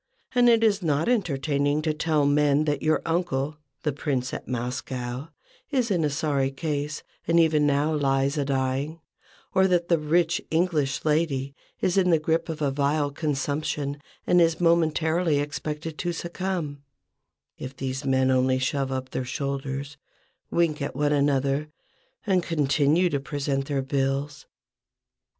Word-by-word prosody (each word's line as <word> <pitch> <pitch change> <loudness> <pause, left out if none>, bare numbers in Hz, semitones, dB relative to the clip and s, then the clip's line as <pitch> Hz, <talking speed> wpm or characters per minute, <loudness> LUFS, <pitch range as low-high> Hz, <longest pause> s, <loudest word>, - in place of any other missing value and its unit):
And 245 -1 +5
it 230 -1 +4
is 210 -2 +3
not 155 -2 +1
entertaining 145 - +1
to 155 -1 +1
tell 155 -1 +1
men 145 +1 +3
that 150 -1 0
your 155 0 +1
uncle, 155 -4 -1 0.3
the 150 - +1
Prince 130 -3 -2
at - - -6
Moscow, 125 +2 -4 0.4
is 255 -6 0
in 165 -5 +2
sorry 140 -2 0
case, 145 +1 -3 0.2
and 170 0 +4
even 155 -3 +4
now 145 +2 +2
lies 135 -1 +1
a 145 - 0
dying, 135 +3 -1 0.5
or 190 0 +4
that 175 -2 +1
the 170 -2 +4
rich 165 +2 +1
English 160 -5 0
lady 150 -3 0 0.3
is 185 +1 +1
in 185 -2 +4
the 165 - +5
grip 160 +2 0
of 155 -2 -3
a 140 - +1
vile 145 +1 +1
consumption 145 0 -2 0.2
and 180 0 +4
is 165 -1 +3
momently 165 -1 +2
expected 150 +2 -4
to 175 -1 -1
succumb, 170 -4 -4 0.8
if 130 +1 -7
these 130 +1 -3
men 130 -1 +2
only 130 0 +3
shove 135 +1 -1
up 130 0 -4
their - - -2
shoulders, 140 +2 -4 0.5
wink 165 -4 +1
at 140 - -3
one 145 +1 +1
another, 140 0 +1 0.6
and 190 -3 +3
continue 150 +1 +2
to 145 -5 -1
present 135 -1 -2
their 140 -2 -1
bills. 135 +1 -2
150 Hz, 150 wpm, -25 LUFS, 135-165 Hz, 0.8 s, And